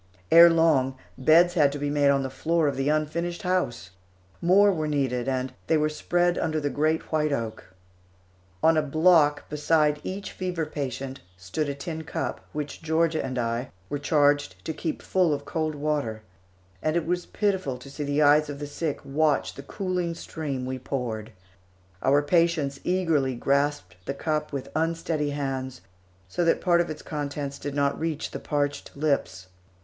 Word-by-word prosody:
Ere 170 +1 +10
long, 155 -6 +3 0.2
beds 165 +6 +5
had 150 -5 +4
to 145 - -4
be 145 0 -2
made 145 -1 +3
on 140 -1 +3
the 135 - -3
floor 165 +3 +1
of 140 - 0
the 135 +2 0
unfinished 170 +5 -1
house. 180 - -1 0.5
More 200 +4 +5
were 155 -3 -2
needed, 135 -4 0
and 130 -1 -1
they 160 - +3
were 155 0 +2
spread 175 +3 +1
under 155 -1 0
the 145 -1 -2
great 155 +4 0
white 155 -1 +1
oak. 115 -5 -3 1.0
On 160 0 +5
a - - +4
block 155 0 +3
beside 150 0 +2
each 195 +2 -5
fever 180 -3 -3
patient 135 -3 -5 0.2
stood 95 - -3
a 140 - -3
tin 160 +3 -5
cup, 160 - -4
which 150 -1 -5
Georgia 160 0 +1
and 130 -1 -4
I 120 +1 -1 0.2
were 145 - -2
charged 145 - +1
to 160 - -2
keep 160 0 -4
full 180 -5 +2
of 140 - -8
cold 155 -2 -2
water, 145 -7 -2 0.6
and 155 +1 0
it 170 -2 +1
was 175 +1 -1
pitiful 190 -10 -1
to 135 +2 -12
see 150 - -5
the 145 +1 +1
eyes 150 +1 +5
of 145 - -5
the 145 - -5
sick 145 +1 -3
watch 150 +2 +1
the - - -9
cooling 180 +2 -3
stream 145 -6 -4
we 130 0 -4
poured. 120 -5 -4 0.7
Our 140 +2 +3
patients 155 -3 +1
eagerly 165 -8 +1
grasped 140 -7 0
the 140 - -2
cup 150 +1 -2
with 140 -2 -5
unsteady 160 -2 0
hands, 135 -2 -3 0.5
so 135 - -1
that 165 - +3
part 175 -1 +3
of 175 - -3
its 155 - -6
contents 145 -2 -4
did 145 0 -5
not 140 -1 +1
reach 160 -2 -2
the - - -5
parched 145 -2 -2
lips. 140 -11 -1
150 Hz, 175 wpm, -26 LUFS, 140-165 Hz, 1.0 s, Ere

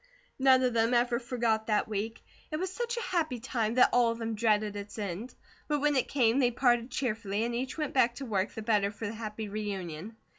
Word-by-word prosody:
None 260 -1 +5
of 250 -1 +2
them 230 +1 +2
ever 240 0 +2
forgot 235 -3 0
that 210 -2 +1
week. 220 +1 -4 0.3
It 310 - -3
was 375 +3 -3
such 475 +2 -3
a - - -1
happy 315 - -1
time 225 -1 -1
that 255 - +6
all 245 -1 +5
of 230 - -4
them 225 -1 -3
dreaded 215 -1 +1
its 205 +1 -7
end; 210 +4 -5 0.3
but 295 -1 +1
when 295 0 +2
it 260 - +2
came 245 -2 +2
they 250 -3 +4
parted 240 0 +2
cheerfully, 215 -5 -2
and 235 +1 -1
each 255 +5 -3
went 305 -3 -2
back 240 -2 +3
to 275 - -6
work, 200 -4 0
the 220 - -7
better 210 -3 +2
for 210 +2 -7
the 205 - -3
happy 215 -1 -5
reunion. 200 -2 -5
230 Hz, 225 wpm, -30 LUFS, 215-255 Hz, 0.3 s, that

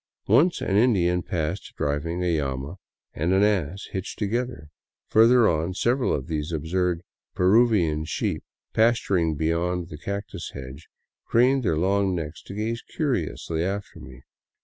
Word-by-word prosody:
Once 150 - +3
an 95 - 0
Indian 90 -7 +3
passed 85 +1 -3
driving 80 +5 -1
a 85 -4 +1
llama 70 +5 -4 0.4
and 85 +5 0
an 95 +1 +4
ass 100 -3 0
hitched 95 +1 -5
together; 115 -5 -3 0.4
further 115 +1 +5
on 85 +3 0
several 125 +5 +1
of 70 - -1
these 80 0 -3
absurd 85 +2 -1 0.2
" - - -59
Peruvian 90 -6 +3
sheep," 80 - -2 0.3
pasturing 100 -8 +2
beyond 85 +3 -1
the 75 - -9
cactus 100 -1 -5
hedge, 70 +3 -9 0.4
craned 130 +3 +4
their 85 -9 0
long 95 +2 +1
necks 80 -2 -5
to 100 - -10
gaze 115 +2 -2
curiously 85 - -2
after 100 +2 -4
me. 65 0 -12
90 Hz, 145 wpm, -25 LUFS, 80-105 Hz, 0.4 s, further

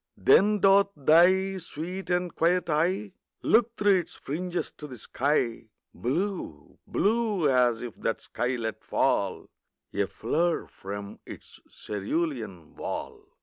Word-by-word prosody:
Then 210 0 +4
doth 195 0 +5
thy 185 +6 +4
sweet 180 +3 -6
and 180 -1 0
quiet 175 0 +2
eye 185 +6 0 0.3
Look 235 0 +3
through 200 -2 +4
its 175 - -7
fringes 175 +5 -4
to 150 - -8
the 130 -3 -9
sky, 120 -2 -1 0.3
Blue 170 - -3
blue 210 -6 +1
as 125 -3 +3
if 120 - -6
that 115 - -2
sky 125 +1 -2
let 110 -2 -4
fall - - 0 0.5
A 100 -1 0
flower 165 - 0
from 100 +1 -8
its - - -12
cerulean 105 - -4
wall. - - -6
165 Hz, 125 wpm, -27 LUFS, 120-190 Hz, 0.5 s, doth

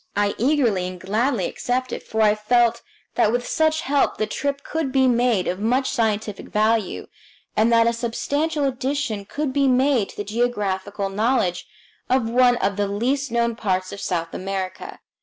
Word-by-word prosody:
I 205 0 +1
eagerly 235 -8 +2
and 185 0 -7
gladly 215 +3 0
accepted, 255 0 -2
for 220 0 -1
I 210 -1 +5
felt 235 +2 +2 0.3
that 220 -3 +3
with 245 +1 -1
such 315 0 +1
help 280 +1 +1
the 215 - 0
trip 280 +4 -3
could 315 -4 -2
be 265 -1 +3
made 240 -6 +2
of 185 - -2
much 250 +5 +1
scientific 220 -4 -1
value, 215 -1 0 0.5
and 220 +2 +3
that 230 0 +5
a 235 - +2
substantial 285 +6 -1
addition 260 -5 -2
could 290 +4 -3
be 280 0 +2
made 255 -4 +2
to - - -13
the 205 - -2
geographical 205 -3 -2
knowledge 200 -3 0 0.4
of 255 -3 +2
one 245 +1 +4
of 200 -4 -1
the 205 0 +1
least 255 +8 -1
known 235 0 +1
parts 185 -4 -1
of 200 - -7
South 165 -2 -2
America. 190 -1 -5
230 Hz, 170 wpm, -22 LUFS, 205-260 Hz, 0.5 s, I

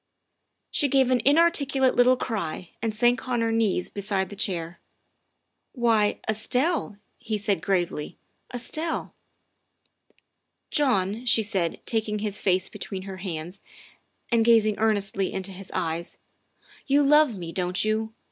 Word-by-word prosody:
' - - -52
' - - -52
She 290 - +2
gave 265 -1 +3
an 250 -2 +3
inarticulate 280 -4 +3
little 250 +1 +5
cry 185 -8 -4
and 225 0 0
sank 240 +4 +1
on 240 -2 +1
her 230 0 +1
knees 220 -5 0
beside 195 -2 -2
the - - -7
chair. 175 -4 -2 0.5
" - - -51 0.2
Why, 225 -5 +2
Estelle," 250 - 0 0.2
he 220 -3 -3
said 205 -1 -1
gravely, 175 -6 -1 0.2
" - - -24
Estelle." 310 +7 -3 0.8
" - - -52 0.7
John," 225 -6 +1
she 230 -2 +4
said, 190 -6 -1
taking 220 -2 -1
his 210 -1 -3
face 185 -1 +1
between 190 -1 -6
her 190 -1 -7
hands 180 0 -6 0.7
and 230 -1 +4
gazing 225 -2 +4
earnestly 200 -3 +1
into 190 0 -4
his 190 0 -9
eyes, 170 -1 -3 0.3
" - - -27
you 285 +1 +4
love 295 -5 +4
me, 170 -2 -6
don't 180 +2 -1
you? 220 +1 0
215 Hz, 150 wpm, -25 LUFS, 190-245 Hz, 0.8 s, little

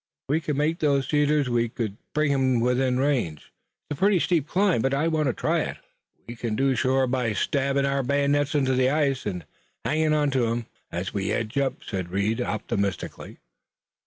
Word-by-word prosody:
If - - -65
we 155 +3 +2
could 150 -3 -2
make 155 +3 0
those 140 -3 +1
cedars 150 -1 +2
we 120 -2 0
would 110 -4 -2 0.2
bring 150 -1 +2
him 130 -3 +2
within 125 +1 +1
range. 125 - -1 0.3
It's 145 - -5
a - - -16
pretty 200 -1 +4
steep 165 -4 +1
climb, 185 - +2
but 135 +2 +1
I 150 +4 +1
want 155 -3 +1
to 130 - +1
try - - 0
it." - - -3 0.5
"We 120 - -7
kin 115 -2 -3
do 135 +4 +2
it 130 - +1
shore 130 +1 +2
by 125 -3 0
stabbin' 140 +4 0
our 140 0 +1
bayonets 140 +2 +1
into 135 -2 +2
the 130 0 +3
ice 140 -5 0
and 90 -4 -4 0.4
hangin' 155 +4 +2
on 150 -2 +2
to 130 -3 +1
'em 115 +1 -2 0.3
ez 90 +3 -4
we 100 -2 -1
edge 110 -1 -2
up," 135 -2 -1
said 95 -4 -4
Reed 100 +6 0
optimistically. 100 -3 -3
135 Hz, 200 wpm, -25 LUFS, 115-145 Hz, 0.5 s, pretty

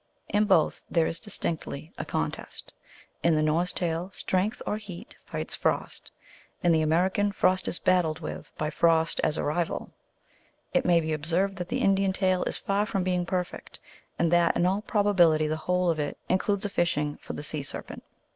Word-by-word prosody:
In 210 +1 +3
both 185 -7 +3
there 165 -2 +3
is 165 - -2
distinctly 165 -6 -4
a - - -4
con - - -1
test. - - -10 0.5
In 170 -1 +3
the 155 - +2
Norse 165 +4 +1
tale 175 0 -2
Strength 190 +5 0
or 210 - -1
Heat 200 -5 -9 0.2
rights - - -4
Frost; - - -1 0.5
in 175 - +4
the 160 -1 +4
American, 185 +6 +2
Frost 185 -1 +2
is - - -1
battled 175 -4 +2
with 155 - -7
by 155 0 -1
Frost 165 -1 +2
as 155 - +1
a - - -1
rival. 160 +3 -2 0.8
It - - +2
may 170 -2 +5
be 160 0 -2
observed 175 +6 0
that 180 -1 -5
the - - -1
Indian 195 -1 +3
tale 185 -2 +1
is - - -2
far 200 +2 0
from 195 -2 -1
being 180 -1 0
perfect, 180 -1 -4 0.4
and 170 -1 +2
that 175 -1 +4
in 175 - +2
all 190 +3 +1
probability 185 -8 +3
the 155 +1 0
whole 180 +2 +1
of 160 - -3
it 145 -1 -2
includes 200 +2 +1
a - - -1
fishing 150 -5 0
for - - -8
the - - -5
sea 150 0 -2
serpent. 140 - -7
175 Hz, 190 wpm, -27 LUFS, 160-190 Hz, 0.8 s, may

